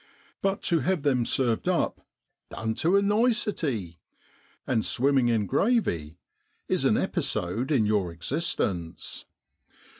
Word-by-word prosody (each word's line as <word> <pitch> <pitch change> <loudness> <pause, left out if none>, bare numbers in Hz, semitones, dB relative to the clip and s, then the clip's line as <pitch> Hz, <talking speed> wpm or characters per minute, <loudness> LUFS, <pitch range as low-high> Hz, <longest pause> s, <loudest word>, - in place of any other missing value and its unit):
But 195 0 -1
to 170 -2 +2
have 170 +2 0
them 130 -5 +2
served 120 -4 +1
up - - 0 0.3
< - - -55
dun 110 0 -3
tu 170 - +1
a 200 - +3
nicety,' 200 - 0 0.7
and 115 -4 +1
swimming 135 -1 +2
in 115 -3 +2
gravy, 90 - 0 0.5
is - - 0
an - - +4
episode 110 - -1
in 125 -7 +3
your 105 -4 +1
existence. 85 - -3
125 Hz, 125 wpm, -27 LUFS, 100-170 Hz, 0.7 s, an